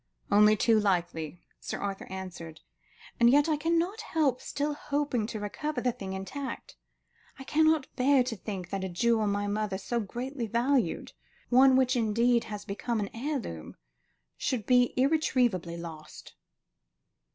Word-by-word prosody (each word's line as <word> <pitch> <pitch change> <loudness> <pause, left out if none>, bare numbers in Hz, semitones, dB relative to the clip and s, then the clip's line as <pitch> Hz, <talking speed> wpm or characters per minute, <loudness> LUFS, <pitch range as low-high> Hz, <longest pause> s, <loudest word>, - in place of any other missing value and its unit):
"Only 210 +1 +6
too 225 0 +4
likely," 175 -4 -1 0.2
Sir - - -5
Arthur 200 -1 -4
answered; 180 -4 -8 0.6
"and 235 0 +6
yet 285 +4 +5
I 315 - +2
cannot 335 +7 0
help 305 - 0
still 290 +1 -2
hoping 285 -6 -1
to 220 - -5
recover 255 +8 -3
the 250 0 +1
thing 195 -4 -7
intact. 270 - -6 0.6
I 270 - -8
cannot 315 0 +3
bear 265 0 +4
to 245 -2 -4
think 190 -3 -6
that 195 -1 -2
a 190 - -3
jewel 220 +4 +1
my 205 0 0
mother 205 -1 -1
so 235 +4 -2
greatly 240 +4 -4
valued, 235 -3 0 0.4
one 260 +1 +6
which 255 0 +3
indeed 235 +1 +2
has 210 -1 -7
become 220 +3 -2
an 200 -1 -3
heirloom, 240 - -4 0.6
should 235 -6 -2
be 245 -1 +3
irretrievably 250 - +1
lost." 160 -2 -10
235 Hz, 145 wpm, -29 LUFS, 200-270 Hz, 0.6 s, Only